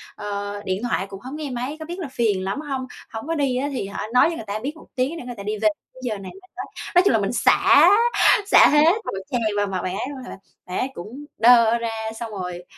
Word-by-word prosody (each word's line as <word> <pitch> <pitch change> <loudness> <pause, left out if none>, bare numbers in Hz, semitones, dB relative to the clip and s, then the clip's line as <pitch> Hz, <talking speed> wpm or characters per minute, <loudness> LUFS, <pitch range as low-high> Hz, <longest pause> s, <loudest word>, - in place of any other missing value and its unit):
ờ, 205 0 -5
điện 190 +4 -2
thoại 200 -5 -1
cũng 195 -1 -9
hông 265 +4 -7
nghe 300 -3 -5
máy, 250 +4 -4
có 315 - -6
biết 350 +3 -7
là 330 - -4
phiền 215 -7 0
lắm 195 +10 -3
hông? 265 -3 -4 0.3
Hổng 225 +7 -6
có 330 - -1
đi 270 -4 0
á 280 +2 -1
thì 225 -7 -3
hả 200 - -5
nói 250 - +6
cho 335 - -4
người 220 - -7
ta 205 +2 -3
biết 285 +7 -5
một - - -15
tiếng 265 +6 -1
để 250 - -8
người 245 -1 -6
ta 200 - -7
đi 210 +1 -3
về, 215 0 +3 0.3
giờ 220 -4 -2
này 195 -1 -9
mới 375 0 -17
tới." - - -5 0.3
Nói 355 - +8
chung - - +3
là - - +3
mình - - -1
xả, - - +5 0.6
xả - - +7
hết 300 +3 +5
một - - -3 0.2
tràng 245 -2 0 0.2
vào 205 0 +1
mặt 190 -2 -3
bạn 185 +1 -3
ấy 250 - -3
luôn, 265 -3 -8
hả, - - -9 0.3
bạn 180 - -3
ấy 255 - 0
cũng 245 +11 -9
đơ 235 -1 +6
ra, 230 -1 -2 0.3
xong 230 -2 -5
rồi, 180 -3 -6
240 Hz, 270 wpm, -22 LUFS, 205-280 Hz, 0.6 s, Nói